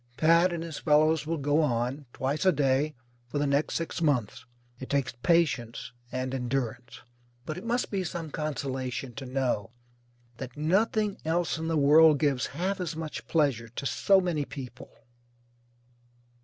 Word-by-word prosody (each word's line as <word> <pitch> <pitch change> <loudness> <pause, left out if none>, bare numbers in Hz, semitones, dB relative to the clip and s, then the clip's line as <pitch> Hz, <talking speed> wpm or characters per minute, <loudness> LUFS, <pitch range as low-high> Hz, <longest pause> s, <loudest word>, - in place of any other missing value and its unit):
Pat 170 +3 +5
and 170 -1 -3
his 165 -3 -6
fellows 155 0 +3
will 165 0 -1
go 145 +2 +2
on, 130 0 -1
twice 135 +5 -2
a 190 - +5
day, 145 0 +1 0.3
for 135 - -4
the 145 - +1
next 140 +2 +1
six 165 0 -3
months. 120 -7 0 0.3
It 130 - -8
takes 140 -3 0
patience 130 -11 +1 0.2
and 130 0 -3
endurance. 125 -2 -3 0.4
But 155 - -4
it - - -12
must 240 +2 -1
be 195 -2 -1
some 165 -2 -5
consolation 135 -4 -3
to 120 +4 -7
know 125 -6 -1 0.7
that 130 0 -8
nothing 205 +6 +1
else 165 0 0
in 160 - -3
the 165 -1 +1
world 150 +2 +6
gives 140 -5 +1
half 190 +3 -1
as 170 -3 -3
much 160 -1 -6
pleasure 140 -8 +1
to 120 +4 -6
so 195 +7 +4
many 175 -5 -1
people. 135 -3 -9
150 Hz, 155 wpm, -28 LUFS, 130-165 Hz, 0.7 s, world